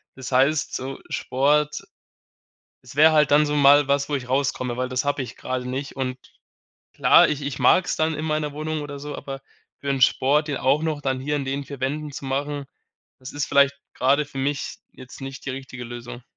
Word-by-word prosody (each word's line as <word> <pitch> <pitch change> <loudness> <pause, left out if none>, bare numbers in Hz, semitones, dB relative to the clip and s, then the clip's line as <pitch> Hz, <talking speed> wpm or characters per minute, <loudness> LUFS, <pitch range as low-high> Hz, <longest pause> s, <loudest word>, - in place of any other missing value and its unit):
Das 130 0 -8
heißt 140 +4 +2
so 135 +1 -5
Sport 150 +3 +1 1.0
es - - -13
wäre 155 +2 +7
halt 150 -2 +4
dann 150 +1 +6
so 150 0 -1
mal 145 0 +6
was, 140 +1 +1
wo 145 - 0
ich 125 -2 -5
rauskomme, 130 -2 -1
weil 130 +1 -2
das 130 +2 -1
habe 145 -1 0
ich 120 -3 -7
grade 125 -1 -4
nicht. 135 +2 -4
Und 130 -1 -3 0.8
klar, - - +6
ich 150 -1 -2
ich 140 -2 -4
mag's 185 - +3
dann 160 +1 +1
in 155 +1 -4
meiner 155 -1 -1
Wohnung 155 0 -3
oder 145 -1 -7
so, 145 0 -6
aber 135 -1 -7 0.4
für 140 - -7
'n 135 - 0
Sport, 145 +5 +3
den 145 -3 -2
auch 140 +5 +2
noch 155 -2 -1
dann 135 -2 -1
hier 145 +3 -2
in 140 - -1
den 140 +1 -3
4 140 -2 -9
Wänden 145 +2 -2
zu 135 - -8
machen, 140 +1 -3 0.5
das 130 0 -9
ist 145 0 -2
vielleicht 140 0 +4 0.2
grade 140 +3 +2
für 135 - -9
mich 140 +2 -2 0.2
jetzt 130 +1 -13
nicht 135 0 -7
die 140 - -3
richtige 130 -1 -7
Lösung. 120 +1 -8
140 Hz, 210 wpm, -23 LUFS, 130-150 Hz, 1.0 s, wäre